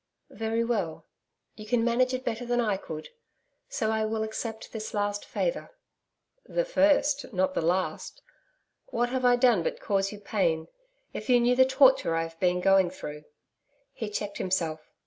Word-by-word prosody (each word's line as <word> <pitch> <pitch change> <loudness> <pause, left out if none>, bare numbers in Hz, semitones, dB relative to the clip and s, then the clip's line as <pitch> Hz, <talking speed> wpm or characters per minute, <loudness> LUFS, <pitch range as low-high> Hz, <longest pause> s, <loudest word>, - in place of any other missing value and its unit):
'Very 225 +1 -1
well. 205 -9 -2 0.5
You 215 0 -10
can 230 +1 +2
manage 245 +2 +2
it 255 0 -3
better 235 +1 -2
than 240 0 0
I 215 -4 +1
could. 160 -5 -7 0.6
So 225 - -1
I 220 0 0
will 220 0 -1
accept 220 0 -5
this 220 0 -6
last 205 0 -1
favour.' - - -2 0.8
'The - - -1
first, 290 - +2
not 185 -2 0
the - - 0
last. 180 +3 -2 0.6
What 245 - 0
have 255 0 -1
I 245 0 +6
done 240 -6 +4
but - - -3
cause 195 -1 0
you 210 - -9
pain?... 170 -6 -1 0.4
If - - -7
you 245 -1 +6
knew 240 +1 +3
the 260 +1 +6
torture 265 - +4
I 165 - +1
have 165 0 -9
been 180 -1 +2
going 195 -1 +4
through....' 150 -4 -8 0.7
He 220 - -5
checked 205 -1 -4
himself. 165 -4 -2
220 Hz, 170 wpm, -28 LUFS, 185-245 Hz, 0.8 s, I